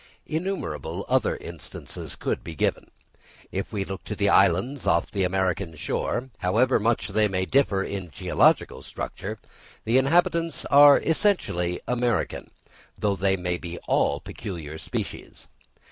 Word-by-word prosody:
Innumerable 100 Hz, -, -3 dB
other 130 Hz, -3 st, +2 dB
instances 80 Hz, -6 st, -8 dB
could -, -, -2 dB
be 80 Hz, -, -7 dB
given. -, -, -1 dB, 0.6 s
If 95 Hz, +1 st, -3 dB
we 100 Hz, -3 st, -2 dB
look 95 Hz, -1 st, -6 dB
to -, -, -4 dB
the -, -, +1 dB
islands 125 Hz, +11 st, +3 dB
off 85 Hz, -, +2 dB
the 100 Hz, -, 0 dB
American 95 Hz, -2 st, 0 dB
shore, 125 Hz, -, -2 dB
however 115 Hz, +7 st, +3 dB
much 115 Hz, +2 st, 0 dB
they 110 Hz, -1 st, +2 dB
may 95 Hz, -2 st, -1 dB
differ 105 Hz, -6 st, +2 dB
in 95 Hz, -4 st, -5 dB
geological 70 Hz, -, +2 dB
structure, -, -, -6 dB, 0.5 s
the 120 Hz, +4 st, +4 dB
inhabitants 170 Hz, +3 st, +1 dB
are 145 Hz, 0 st, +9 dB
essentially 155 Hz, -, 0 dB
American, 120 Hz, -3 st, -1 dB, 0.5 s
though 100 Hz, -1 st, +1 dB
they 95 Hz, 0 st, +1 dB
may 90 Hz, -1 st, -2 dB
be 85 Hz, -1 st, -6 dB
all 70 Hz, -, +2 dB
peculiar 80 Hz, -3 st, -7 dB
species. -, -, -6 dB
100 Hz, 135 wpm, -25 LUFS, 90-130 Hz, 0.6 s, are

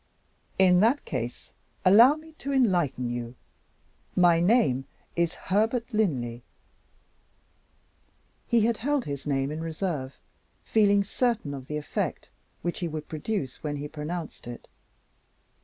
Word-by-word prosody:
"In 180 Hz, -1 st, +6 dB
that 235 Hz, +8 st, +3 dB
case 120 Hz, -2 st, -5 dB, 0.3 s
allow 230 Hz, +9 st, +8 dB
me 315 Hz, +1 st, -13 dB
to 280 Hz, -, -4 dB
enlighten 175 Hz, -, +1 dB
you. 120 Hz, 0 st, -5 dB, 0.8 s
My 175 Hz, -2 st, +5 dB
name 175 Hz, -, +3 dB, 0.3 s
is 170 Hz, 0 st, +1 dB
Herbert 225 Hz, +5 st, 0 dB
Linley." 125 Hz, -, 0 dB, 2.1 s
He 235 Hz, -1 st, +3 dB
had 225 Hz, +1 st, +2 dB
held 285 Hz, +3 st, 0 dB
his 140 Hz, 0 st, -5 dB
name 135 Hz, 0 st, 0 dB
in 155 Hz, +1 st, -4 dB
reserve, 160 Hz, -5 st, -3 dB, 0.5 s
feeling 205 Hz, -2 st, +3 dB
certain 225 Hz, -, -1 dB
of 135 Hz, -2 st, -8 dB
the 150 Hz, -, -3 dB
effect 150 Hz, -, -3 dB, 0.3 s
which 175 Hz, +1 st, -2 dB
he 175 Hz, -, -1 dB
would 155 Hz, -1 st, -6 dB
produce 155 Hz, -, -3 dB
when 150 Hz, -1 st, -3 dB
he 145 Hz, +1 st, -4 dB
pronounced 155 Hz, -1 st, -6 dB
it. 120 Hz, -1 st, -8 dB
170 Hz, 125 wpm, -27 LUFS, 140-220 Hz, 2.1 s, allow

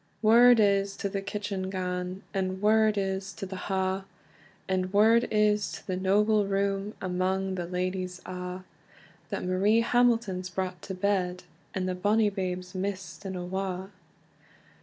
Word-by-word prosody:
Word 235 Hz, +2 st, +7 dB
is 200 Hz, -1 st, +3 dB
to -, -, -2 dB
the 195 Hz, 0 st, -3 dB
kitchen 195 Hz, -1 st, -4 dB
gane, 180 Hz, 0 st, -3 dB
And 190 Hz, -1 st, -1 dB
word 215 Hz, +1 st, +4 dB
is 195 Hz, 0 st, -2 dB
to 200 Hz, -, -6 dB
the 190 Hz, 0 st, -7 dB
ha, 190 Hz, 0 st, -1 dB, 0.6 s
And 185 Hz, -1 st, 0 dB
word 220 Hz, +3 st, +5 dB
is 210 Hz, -1 st, +2 dB
to -, -, -9 dB
the 185 Hz, -, -2 dB
noble 205 Hz, +2 st, +2 dB
room, 195 Hz, +1 st, -1 dB
Amang 185 Hz, +1 st, -1 dB
the 175 Hz, -2 st, -3 dB
ladyes 185 Hz, 0 st, -3 dB
a', 180 Hz, 0 st, -6 dB, 0.7 s
That -, -, -3 dB
Marie 200 Hz, +5 st, +3 dB
Hamilton's 230 Hz, -6 st, +2 dB
brought 185 Hz, -1 st, -4 dB
to 190 Hz, -, -6 dB
bed, 185 Hz, -2 st, 0 dB, 0.3 s
And 185 Hz, -1 st, -1 dB
the 185 Hz, -, 0 dB
bonny 205 Hz, +3 st, +2 dB
babe's 185 Hz, -2 st, -4 dB
mist 185 Hz, -2 st, -4 dB
and 190 Hz, -1 st, -4 dB
awa. 190 Hz, +1 st, -4 dB
190 Hz, 145 wpm, -28 LUFS, 185-205 Hz, 0.7 s, Word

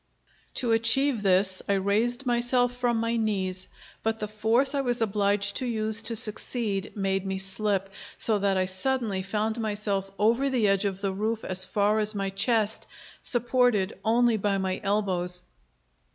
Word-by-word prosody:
To 240 Hz, -2 st, 0 dB
achieve 230 Hz, +2 st, +2 dB
this 190 Hz, -1 st, +2 dB
I -, -, +4 dB
raised 220 Hz, +7 st, 0 dB
myself 245 Hz, 0 st, +1 dB
from 245 Hz, -2 st, 0 dB
my 230 Hz, +1 st, 0 dB
knees; 190 Hz, -4 st, -2 dB, 0.3 s
but 225 Hz, 0 st, -1 dB
the 210 Hz, -, -4 dB
force 225 Hz, +6 st, +1 dB
I 280 Hz, -, +1 dB
was 245 Hz, -2 st, -1 dB
obliged 200 Hz, -2 st, +1 dB
to 255 Hz, -, -3 dB
use 220 Hz, -1 st, 0 dB
to 230 Hz, 0 st, -2 dB
succeed 210 Hz, -1 st, -2 dB
made 195 Hz, -2 st, 0 dB
me 190 Hz, 0 st, -3 dB
slip, 195 Hz, 0 st, -1 dB, 0.3 s
so 215 Hz, -2 st, +2 dB
that 195 Hz, -1 st, +1 dB
I 185 Hz, -, +2 dB
suddenly 200 Hz, +1 st, -1 dB
found 215 Hz, +4 st, -2 dB
myself 205 Hz, -2 st, -2 dB
over 235 Hz, +6 st, +2 dB
the 245 Hz, -5 st, +2 dB
edge 195 Hz, 0 st, +2 dB
of 195 Hz, -1 st, -2 dB
the 195 Hz, -1 st, -1 dB
roof 215 Hz, +3 st, -2 dB
as 185 Hz, 0 st, 0 dB
far 210 Hz, +1 st, +1 dB
as 215 Hz, 0 st, 0 dB
my 195 Hz, -1 st, -2 dB
chest, 215 Hz, +1 st, 0 dB, 0.3 s
supported 240 Hz, -5 st, +2 dB
only 230 Hz, 0 st, +3 dB
by 200 Hz, -1 st, 0 dB
my 190 Hz, -1 st, -2 dB
elbows. 185 Hz, -3 st, 0 dB
210 Hz, 165 wpm, -27 LUFS, 195-235 Hz, 0.3 s, I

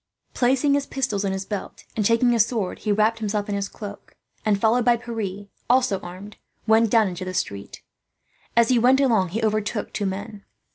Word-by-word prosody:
Placing 265 Hz, +3 st, +2 dB
his 280 Hz, -1 st, 0 dB
pistols 215 Hz, -7 st, -2 dB
in 195 Hz, -, 0 dB
his 190 Hz, 0 st, -3 dB
belt 205 Hz, -1 st, -6 dB
and 215 Hz, -, 0 dB
taking 230 Hz, +3 st, +3 dB
his 230 Hz, -3 st, +5 dB
sword, 220 Hz, -7 st, -3 dB
he 215 Hz, -, -1 dB
wrapped 215 Hz, +2 st, +2 dB
himself 210 Hz, -1 st, -2 dB
in -, -, -1 dB
his 200 Hz, 0 st, -2 dB
cloak 205 Hz, -2 st, -10 dB, 0.3 s
and, 205 Hz, -2 st, +1 dB
followed 230 Hz, +3 st, +3 dB
by 240 Hz, 0 st, +4 dB
Pierre, 220 Hz, -4 st, -5 dB, 0.2 s
also 250 Hz, -6 st, +3 dB
armed, 185 Hz, +4 st, -10 dB, 0.3 s
went 220 Hz, 0 st, +4 dB
down 220 Hz, -1 st, +4 dB
into 180 Hz, 0 st, -5 dB
the 185 Hz, 0 st, -5 dB
street. 100 Hz, -, -4 dB, 0.7 s
As 235 Hz, +1 st, +5 dB
he 250 Hz, -2 st, +4 dB
went 255 Hz, +3 st, +4 dB
along 225 Hz, -10 st, +2 dB
he 220 Hz, +6 st, -3 dB
overtook 215 Hz, 0 st, -1 dB
two 205 Hz, -, -1 dB
men. 200 Hz, +2 st, -6 dB
215 Hz, 195 wpm, -23 LUFS, 200-235 Hz, 0.7 s, his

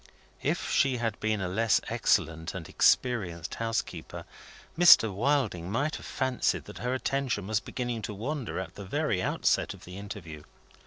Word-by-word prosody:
If -, -, -1 dB
she 135 Hz, -2 st, +3 dB
had 115 Hz, -2 st, -2 dB
been 110 Hz, -2 st, 0 dB
a 90 Hz, -, -1 dB
less 110 Hz, +4 st, +2 dB
excellent 80 Hz, +2 st, 0 dB
and 90 Hz, -4 st, -6 dB
experienced 95 Hz, -9 st, +1 dB
housekeeper, 115 Hz, 0 st, -3 dB, 0.5 s
Mr. 165 Hz, -, +7 dB
Wilding 110 Hz, -, 0 dB
might 145 Hz, +8 st, 0 dB
have -, -, -10 dB
fancied 130 Hz, -2 st, 0 dB
that -, -, -10 dB
her 125 Hz, +1 st, -1 dB
attention 130 Hz, -6 st, -1 dB
was 110 Hz, +1 st, +1 dB
beginning 120 Hz, -1 st, -4 dB
to 105 Hz, -, -5 dB
wander 130 Hz, +4 st, -4 dB
at 95 Hz, -2 st, -6 dB
the 100 Hz, -, -8 dB
very 125 Hz, -3 st, 0 dB
outset -, -, +1 dB
of -, -, -15 dB
the 90 Hz, +2 st, -8 dB
interview. 95 Hz, -7 st, -8 dB
110 Hz, 160 wpm, -29 LUFS, 95-130 Hz, 0.5 s, Mr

